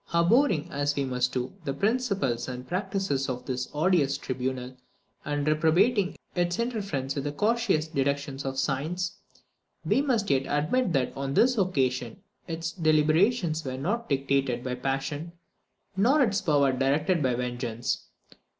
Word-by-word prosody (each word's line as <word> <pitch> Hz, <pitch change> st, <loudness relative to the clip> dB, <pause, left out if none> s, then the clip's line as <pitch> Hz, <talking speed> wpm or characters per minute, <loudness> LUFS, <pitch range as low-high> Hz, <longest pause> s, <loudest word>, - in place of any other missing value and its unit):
Abhorring, 175 Hz, -, +3 dB
as 145 Hz, +1 st, 0 dB
we 140 Hz, -, 0 dB
must 125 Hz, -1 st, 0 dB
do, 125 Hz, -1 st, -3 dB
the 135 Hz, -3 st, -3 dB
principles 200 Hz, -, 0 dB
and 125 Hz, 0 st, -6 dB
practice 185 Hz, -7 st, -1 dB
of 125 Hz, -1 st, -4 dB
this 125 Hz, -1 st, -3 dB
odious 150 Hz, -3 st, +2 dB
tribunal, 130 Hz, -1 st, -4 dB, 0.5 s
and 145 Hz, 0 st, -2 dB
reprobating 170 Hz, +7 st, +3 dB, 0.2 s
its 175 Hz, -1 st, 0 dB
interference 200 Hz, -, -2 dB
with 140 Hz, -, -3 dB
the 145 Hz, -, -1 dB
cautious 205 Hz, -2 st, +1 dB
deductions 140 Hz, -2 st, -1 dB
of 135 Hz, 0 st, -4 dB
science, 155 Hz, +7 st, -1 dB, 0.7 s
we 270 Hz, -, +3 dB
must 240 Hz, -8 st, +1 dB
yet 135 Hz, -1 st, +1 dB
admit 165 Hz, -, +1 dB
that, 135 Hz, -3 st, 0 dB
on 135 Hz, 0 st, -3 dB
this 255 Hz, +1 st, +4 dB
occasion, 130 Hz, -, 0 dB, 0.3 s
its 165 Hz, 0 st, -3 dB
deliberations 160 Hz, +2 st, +2 dB
were 130 Hz, -1 st, -4 dB
not 205 Hz, -, -2 dB
dictated 135 Hz, -3 st, 0 dB
by 125 Hz, -, -2 dB
passion, 135 Hz, +5 st, -3 dB, 0.6 s
nor 260 Hz, +9 st, +4 dB
its 205 Hz, -4 st, +1 dB
power 145 Hz, -6 st, +3 dB
directed 145 Hz, +6 st, +1 dB
by 130 Hz, -3 st, +1 dB
vengeance. 120 Hz, -1 st, -3 dB
145 Hz, 140 wpm, -27 LUFS, 135-185 Hz, 0.7 s, this